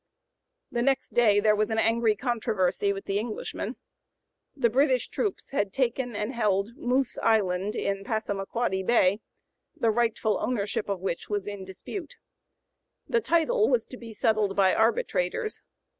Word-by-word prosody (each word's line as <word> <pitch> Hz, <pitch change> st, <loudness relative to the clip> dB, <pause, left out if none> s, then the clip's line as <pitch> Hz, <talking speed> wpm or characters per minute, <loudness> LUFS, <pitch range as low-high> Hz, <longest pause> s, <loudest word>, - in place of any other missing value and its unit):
'" -, -, -55 dB
The -, -, +2 dB
next 270 Hz, +1 st, 0 dB
day 215 Hz, -4 st, +5 dB
there 210 Hz, 0 st, +4 dB
was 215 Hz, 0 st, 0 dB
an 220 Hz, -, -1 dB
angry 225 Hz, -1 st, +3 dB
controversy 215 Hz, -6 st, 0 dB
(p. -, -, +4 dB
091) -, -, -7 dB
with 195 Hz, -, -7 dB
the 195 Hz, +1 st, 0 dB
Englishmen. 220 Hz, 0 st, -4 dB, 0.8 s
The 240 Hz, -4 st, +3 dB
British 260 Hz, -1 st, +2 dB
troops 410 Hz, -9 st, -3 dB
had 205 Hz, -8 st, 0 dB
taken 245 Hz, -1 st, -1 dB
and 210 Hz, +5 st, -2 dB
held 210 Hz, -1 st, 0 dB
Moose 260 Hz, -2 st, 0 dB
Island 205 Hz, -2 st, +1 dB
in 195 Hz, 0 st, -2 dB
Passamaquoddy 205 Hz, -1 st, -2 dB
Bay, 200 Hz, -1 st, +3 dB, 0.6 s
the 235 Hz, -8 st, +2 dB
rightful 225 Hz, -2 st, +1 dB
ownership 205 Hz, -4 st, -2 dB
of 195 Hz, -3 st, -2 dB
which 185 Hz, -3 st, -3 dB
was 205 Hz, -1 st, -2 dB
in 205 Hz, -2 st, -5 dB
dispute. 345 Hz, -, -7 dB, 0.9 s
The 470 Hz, -, +2 dB
title 430 Hz, +7 st, +2 dB
was -, -, +2 dB
to 255 Hz, -, -10 dB
be 230 Hz, -2 st, -10 dB
settled 215 Hz, -2 st, +1 dB
by 190 Hz, -2 st, +4 dB
arbitrators. 470 Hz, -, 0 dB
220 Hz, 160 wpm, -27 LUFS, 200-255 Hz, 0.9 s, day